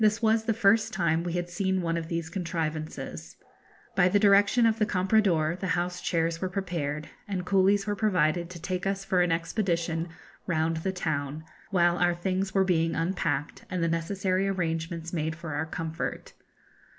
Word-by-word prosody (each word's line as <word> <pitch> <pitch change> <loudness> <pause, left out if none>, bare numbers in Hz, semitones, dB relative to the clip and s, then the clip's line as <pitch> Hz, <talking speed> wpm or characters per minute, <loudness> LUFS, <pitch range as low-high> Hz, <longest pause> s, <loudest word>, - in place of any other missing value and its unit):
This 215 +1 +4
was 220 -1 +2
the 225 - +2
first 210 +1 +3
time 170 -3 +1
we 175 -1 -3
had 175 0 -1
seen 190 +2 0
one 165 0 0
of 165 -1 -3
these 165 -1 -3
contrivances. 160 -3 -4 0.6
By 185 -1 +5
the 200 - +3
direction 205 +3 +5
of 225 0 +2
the 215 - +4
comprador 180 -4 +2
the 190 - -3
house 180 +1 -2
chairs 165 0 0
were 185 - -1
prepared, 170 -6 -3 0.2
and 185 -3 -3
coolies 195 +1 +3
were 205 -1 -1
provided 175 -5 +1
to 180 -1 -9
take 185 +2 -3
us 195 0 -2
for 185 -2 +2
an 175 -1 +2
expedition 170 -1 -1 0.4
round 160 -1 +1
the 190 +4 -1
town, 155 -4 -3 0.3
while 175 -3 +3
our 175 -1 +3
things 190 +2 -1
were 190 0 +3
being 165 -3 +1
unpacked, 165 -4 -1
and 180 -2 -1
the - - +2
necessary 185 +3 0
arrangements 165 -2 -2
made 160 -1 -1
for 165 -2 -6
our 150 +2 -2
comfort. 160 +1 -4
175 Hz, 175 wpm, -28 LUFS, 165-195 Hz, 0.6 s, By